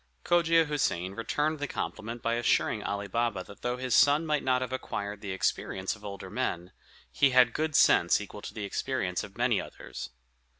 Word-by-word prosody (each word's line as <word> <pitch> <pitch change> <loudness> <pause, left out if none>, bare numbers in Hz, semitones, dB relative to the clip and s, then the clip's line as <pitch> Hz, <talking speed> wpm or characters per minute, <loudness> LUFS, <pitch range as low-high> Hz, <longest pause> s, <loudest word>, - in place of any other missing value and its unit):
Cogia 165 -1 +4
Houssain 95 - -1
returned 150 +7 -1
the 145 - -2
compliment 115 -1 -5
by 115 - +1
assuring 115 -2 +1
Ali 100 0 -3
Baba 115 -2 -1
that 100 - -14
though 125 0 -1
his 130 -1 -2
son 145 +3 +5
might 150 -2 0
not 130 -1 +2
have 130 0 -5
acquired 100 -5 -4
the 100 - -6
experience 95 +1 -1
of 105 - -18
older 100 -2 -7
men, 85 +1 -2 0.4
he 140 - +4
had 125 -2 +5
good 155 -1 -1
sense 85 - +5
equal 105 0 -8
to - - -8
the 105 -2 -4
experience 95 -4 -2
of 100 +1 -11
many 120 -3 +2
others. 65 - -8
115 Hz, 185 wpm, -29 LUFS, 100-135 Hz, 0.4 s, son